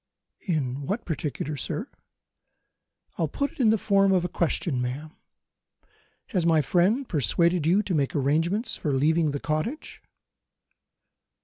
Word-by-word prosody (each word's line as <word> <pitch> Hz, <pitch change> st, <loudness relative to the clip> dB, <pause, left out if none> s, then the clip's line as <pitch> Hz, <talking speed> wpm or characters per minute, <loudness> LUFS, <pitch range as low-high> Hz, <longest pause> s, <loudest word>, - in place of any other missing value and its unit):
"In 140 Hz, -5 st, -2 dB
what 215 Hz, +4 st, -2 dB
particular, 150 Hz, -2 st, -3 dB
sir?" 130 Hz, -, -4 dB, 1.3 s
"I'll 165 Hz, -, +2 dB
put 280 Hz, -, -2 dB
it -, -, -22 dB
in 235 Hz, -4 st, +4 dB
the 220 Hz, -, +4 dB
form 195 Hz, -1 st, +3 dB
of 180 Hz, -2 st, +2 dB
a -, -, -2 dB
question, 165 Hz, -5 st, -1 dB
ma'am. 140 Hz, +6 st, -5 dB, 1.1 s
Has 185 Hz, -8 st, +1 dB
my 165 Hz, -1 st, +4 dB
friend 200 Hz, -, +2 dB
persuaded 170 Hz, +2 st, +1 dB
you 195 Hz, +5 st, +3 dB
to 190 Hz, -, -3 dB
make 140 Hz, -4 st, 0 dB
arrangements 165 Hz, -, +1 dB
for 145 Hz, -, -2 dB
leaving 155 Hz, +4 st, +2 dB
the 145 Hz, 0 st, -3 dB
cottage?" 155 Hz, -, -3 dB
165 Hz, 135 wpm, -26 LUFS, 145-195 Hz, 1.3 s, in